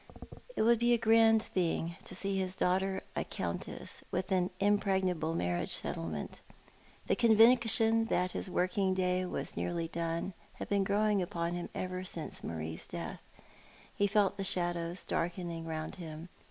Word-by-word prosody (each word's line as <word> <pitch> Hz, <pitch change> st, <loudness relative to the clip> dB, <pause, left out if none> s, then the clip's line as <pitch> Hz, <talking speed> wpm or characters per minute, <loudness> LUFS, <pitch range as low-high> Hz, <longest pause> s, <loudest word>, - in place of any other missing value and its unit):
It -, -, +2 dB
would 235 Hz, 0 st, +5 dB
be 240 Hz, +1 st, +4 dB
a -, -, +4 dB
grand 225 Hz, -1 st, +5 dB
thing 170 Hz, -2 st, -1 dB
to 185 Hz, -, -2 dB
see 195 Hz, +1 st, +1 dB
his 185 Hz, 0 st, -2 dB
daughter 190 Hz, +1 st, 0 dB
a -, -, 0 dB
countess, -, -, -5 dB
with 185 Hz, -, -2 dB
an 180 Hz, -1 st, +2 dB
impregnable 190 Hz, -5 st, +1 dB
marriage 90 Hz, -, 0 dB
settlement. 80 Hz, -3 st, -4 dB, 0.6 s
The -, -, +2 dB
conviction 225 Hz, -1 st, +5 dB
that 185 Hz, -4 st, 0 dB
his 190 Hz, -, -3 dB
working 185 Hz, +1 st, +1 dB
day 185 Hz, 0 st, +1 dB
was -, -, -4 dB
nearly 170 Hz, -1 st, -2 dB
done 170 Hz, +2 st, -3 dB, 0.2 s
had -, -, -7 dB
been 200 Hz, -1 st, +2 dB
growing 205 Hz, 0 st, +2 dB
upon 170 Hz, -1 st, -2 dB
him 175 Hz, 0 st, -4 dB
ever 185 Hz, 0 st, -3 dB
since 170 Hz, -3 st, -4 dB
jMarie's 80 Hz, 0 st, -5 dB
death. -, -, -6 dB, 0.7 s
He 205 Hz, -, +2 dB
felt 200 Hz, -1 st, +2 dB
the 195 Hz, -, -2 dB
shadows 175 Hz, -2 st, 0 dB
darkening 170 Hz, -1 st, -2 dB
round 160 Hz, +3 st, -4 dB
him. 165 Hz, -1 st, -8 dB
185 Hz, 155 wpm, -32 LUFS, 170-205 Hz, 0.7 s, would